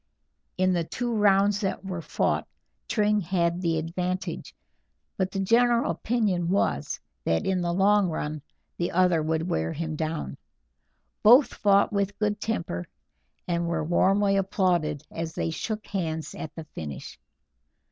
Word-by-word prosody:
In 185 0 +3
the 170 -1 +1
two 240 +8 -3
rounds 205 -1 +4
that 195 -1 -2
were 185 -3 -4
fought, - - -1 0.4
Tring 210 -1 +2
had 170 -1 0
the 165 -2 +1
advantage, 180 +3 -3 0.6
but 190 -1 0
the 195 - -4
general 235 +4 +3
opinion 205 -7 0
was 180 - 0 0.2
that 80 0 0
in 185 -1 +1
the 175 0 0
long 195 +1 +3
run 155 -1 -3 0.4
the 175 - -1
other 180 -2 +3
would 160 +2 -1
wear 80 - -1
him 160 0 -3
down. 155 - -3 0.8
Both 245 +4 +7
fought 200 +1 +3
with 200 0 -1
good 210 -1 -1
temper, 165 - -3 0.6
and 170 -1 0
were 170 -2 -1
warmly 195 +4 +3
applauded 180 -6 0
as 165 0 -5
they 165 - -1
shook 215 +6 -4
hands 160 -5 -3
at 155 - -7
the 165 - -6
finish. 75 - -8
180 Hz, 145 wpm, -26 LUFS, 160-200 Hz, 0.8 s, Both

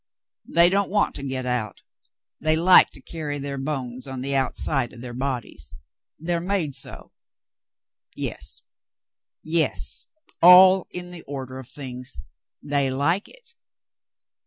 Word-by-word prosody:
They 170 +2 +5
don't 200 0 +1
want 205 +1 +1
to - - -4
get 130 -2 -3
out. 125 -4 -3 0.6
They 155 0 +2
like 175 +3 +6
to - - -9
carry 150 -3 -5
their 140 -1 -4
bones 130 -3 -4
on 130 -1 -6
the 140 +1 -1
out 135 -1 0
side 135 -5 -1
of 120 - -11
their 120 -1 -7
bodies. 120 - -4 0.4
They're 170 +2 -1
made 180 -5 -1
so. 135 - -3 1.0
Yes, - - -3 0.8
yes, 160 0 +1 0.3
all 185 +1 +8
in 180 0 -6
the 175 -2 -9
order 130 -2 -6
of 130 - -10
things. 125 - -7 0.5
They 140 -2 0
like 145 +9 0
it." - - -17
140 Hz, 135 wpm, -24 LUFS, 130-170 Hz, 1.0 s, all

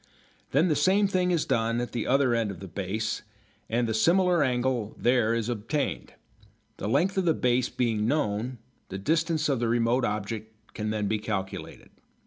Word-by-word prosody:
Then 150 +7 +3
the 155 - +2
same 200 +6 +3
thing 185 -2 +1
is 170 -4 +1
done 115 +1 +1
at 120 - -3
the 120 -3 -3
other 135 -2 +3
end 115 -2 +1
of 95 -4 -7
the 95 - -8
"base" 100 +4 -3 0.5
and 120 +1 +1
the 110 - -1
similar 175 - +3
angle 125 -4 0
there 120 -2 +2
is 115 -1 -1
obtained. 120 +5 -3 0.6
The 105 - -3
length 175 - +2
of 185 - 0
the 165 - +3
base 125 0 +1
being 110 -3 0
known, 125 -3 -1 0.3
the 95 - -5
distance 160 - +1
of 135 -4 +1
the 120 - 0
remote 120 +2 +2
object 110 +1 -3 0.2
can 105 0 -3
then 105 -1 -1
be 105 +1 0
calculated. 100 -3 -5
120 Hz, 180 wpm, -27 LUFS, 110-150 Hz, 0.6 s, Then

